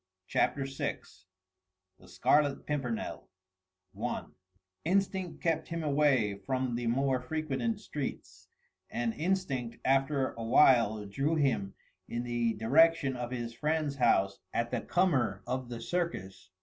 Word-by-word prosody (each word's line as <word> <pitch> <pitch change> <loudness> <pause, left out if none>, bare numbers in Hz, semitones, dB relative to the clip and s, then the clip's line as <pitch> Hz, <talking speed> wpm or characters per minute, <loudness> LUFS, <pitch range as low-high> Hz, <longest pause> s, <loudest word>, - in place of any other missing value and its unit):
CHAPTER 135 +8 +1
VI 135 0 -3 1.0
THE 90 - -17
SCARLET 140 +11 +2
PIMPERNEL 135 -6 -3 0.7
I - - -2 0.6
Instinct 190 0 0
kept 160 -2 +1
him 165 -1 -3
away 140 -9 +2
from 130 +2 -1
the 120 0 -2
more 130 +2 +2
frequented 155 - -2
streets 150 -9 -6 0.4
and 120 -1 -1
instinct 150 -9 -1
after 135 0 +2
awhile 115 -2 +4
drew 140 +11 0
him 130 -10 0 0.3
in 120 +1 -2
the 120 -2 0
direction 140 +4 +4
of 120 -1 -4
his 120 -2 -4
friend's 150 +2 -1
house 100 -6 +3 0.2
at 115 0 0
the - - -1
comer 125 - +1
of 130 -1 -3
The 120 -1 -5
Circus. 95 - -3
130 Hz, 125 wpm, -31 LUFS, 115-150 Hz, 1.0 s, awhile